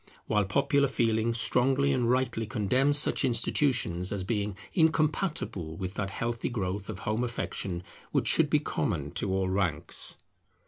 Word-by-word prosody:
while 105 -2 +2
popular 140 +6 +2
feeling 115 -3 +1
strongly 130 +4 +2
and 120 -3 +1
rightly 120 -3 0
condemns 130 +6 +2
such 145 - +1
institutions, 115 - +1
as 100 -2 -2
being 105 -1 -2 0.2
incompatible 155 - 0
with 95 +1 -4
that 100 -1 -2
healthy 115 +3 -2
growth 100 -3 -3
of 105 - -4
home 110 +5 -1
affection 95 -6 -3 0.3
which - - +1
should - - +5
be - - +4
common - - -2
to 95 - -2
all 95 0 +1
ranks. 95 -5 -1
115 Hz, 145 wpm, -29 LUFS, 95-130 Hz, 0.3 s, should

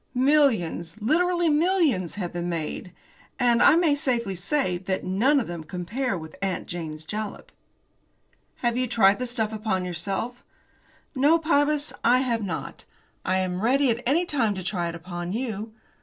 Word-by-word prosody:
"Millions, 240 - +2
literally 345 +9 +2
millions, 305 - +2
have 180 -4 -4
been 175 0 -3
made, 170 +2 -4 0.5
and, 240 -2 +3
I - - +7
may 335 -3 +4
safely 245 -8 0
say, 185 0 -1
that 190 0 -3
none 230 +11 +3
of 245 - -2
them 175 -1 -6
can 155 - -16
compare 200 +6 -2
with 160 -1 -9
'Aunt 195 -2 -2
Jane's 160 -3 -6
Jalap.'" 210 +3 -5 1.1
"Have 240 -1 +2
you 255 0 0
tried 205 -3 +4
the 250 - -2
stuff 225 -3 -1
upon 210 -4 -1
yourself?" 195 +8 -3 0.7
"No, 290 +4 +4
Pybus, 300 -2 +1
I 250 +2 +5
have 235 -3 0
not. 180 -5 -5 0.4
I 185 - 0
am 185 -1 -1
ready 260 +3 +3
at 230 +1 -2
any 325 +7 +3
time 235 -11 +1
to 190 - -5
try 175 -2 -1
it 170 - -6
upon 175 +1 -5
you. 225 -2 -3
220 Hz, 165 wpm, -25 LUFS, 180-270 Hz, 1.1 s, I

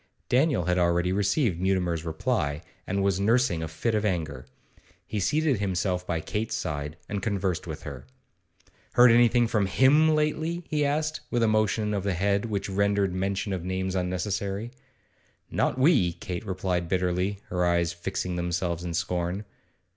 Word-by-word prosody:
Daniel 130 - +2
had 90 0 +1
already 90 +1 +2
received 100 - +1
Mutimer's 90 -4 0
reply, 80 - -1 0.2
and 100 +1 0
was 95 -1 +1
nursing 110 -4 +2
a 80 - -3
fit 85 +9 -2
of 105 -1 +1
anger. 80 -10 -2 0.6
He 105 - -3
seated 140 - +1
himself 90 -2 -1
by 85 -2 -1
Kate's 110 +7 -3
side, 75 +1 -4
and 100 -1 -3
conversed 95 -4 -1
with - - -6
her. 70 -2 -8 0.9
'Heard 125 -1 +7
anything 120 0 +5
from 110 -3 +1
him 145 +9 +5
lately?' 160 +3 -1
he 150 -1 0
asked, 155 +2 0
with 120 -2 +1
a - - +4
motion 110 0 +1
of 100 - 0
the 100 -2 0
head 100 +3 +1
which 105 -3 -2
rendered 100 -1 +1
mention 95 +2 -1
of 90 -3 -3
names 95 +1 -2
unnecessary. 95 +4 -2 0.8
'Not - - 0
we,' 130 - +4
Kate 90 +3 -6
replied 90 -2 -2
bitterly, 90 +2 0
her 90 0 0
eyes 85 -1 +2
fixing 90 0 -3
themselves 85 0 -2
in 85 -1 -3
scorn. 90 +3 -2
95 Hz, 160 wpm, -27 LUFS, 90-110 Hz, 0.9 s, Heard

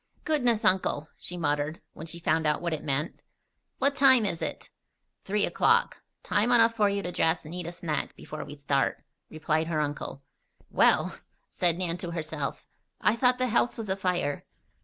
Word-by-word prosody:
"Goodness, 245 -8 +1
Uncle!" 160 -5 +1
she 180 - -5
muttered, 150 -1 -1
when 160 - -9
she 170 - -4
found 160 -1 +1
out 150 - +2
what 170 -1 -2
it 155 - -4
meant. 145 +3 -2 0.6
"What 280 +1 +2
time 260 -5 +6
is 170 -5 -2
it?" - - -5 0.5
"Three 205 +1 +1
o'clock. 470 +1 +2 0.2
Time 210 +4 +1
enough 230 -1 +5
for 210 -3 +2
you 200 0 -2
to 175 - -3
dress 165 -1 +1
and 155 - -8
eat 180 -2 -4
a - - -4
snack 170 -3 -3
before 155 - -7
we 145 +1 -9
start," 140 -1 0 0.3
replied 155 0 -1
her 160 -2 -1
uncle. 145 -2 -4 0.5
"Well!" - - +3 0.3
said 175 -2 +2
Nan 175 -2 -1
to 175 - -5
herself. 155 -3 -4 0.3
"I 210 - +3
thought 250 +1 +3
the 255 0 0
house 240 +2 +1
was 220 -3 -5
afire." 180 -6 -1
175 Hz, 180 wpm, -28 LUFS, 155-215 Hz, 0.6 s, time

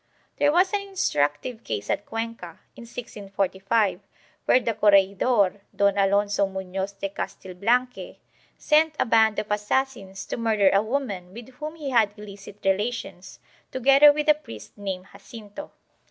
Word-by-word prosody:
There 290 0 +3
was 365 +4 +3
an 410 - +1
instructive 220 - -2
case 105 -2 -4
at 205 - -2
Cuenca, 225 -7 -6 0.2
in 235 - -11
1645, 200 -3 -2 0.5
where 255 - +5
the 230 -2 -2
corregidor, 200 0 +3
Don 200 -1 +2
Alonso 200 0 +2
Muiioz 190 +1 -5
de 195 - -3
Castilblanque 215 +6 -2 0.4
sent 310 0 +2
a - - +3
band 220 -2 +3
of 210 - -3
assassins 210 -2 -2
to - - -5
murder 215 -4 +2
a 195 - +4
woman 215 -7 -4
with 235 +1 -10
whom 300 +5 -8
he 295 -4 -5
had 220 -4 +2
illicit 200 -1 -11
relations, 195 -2 -2 0.3
together 275 +3 +6
with 300 +1 -2
a 300 - +7
priest 115 - -12
named 190 -2 -5
Jacinto. 205 +5 -11
210 Hz, 140 wpm, -24 LUFS, 195-250 Hz, 0.5 s, a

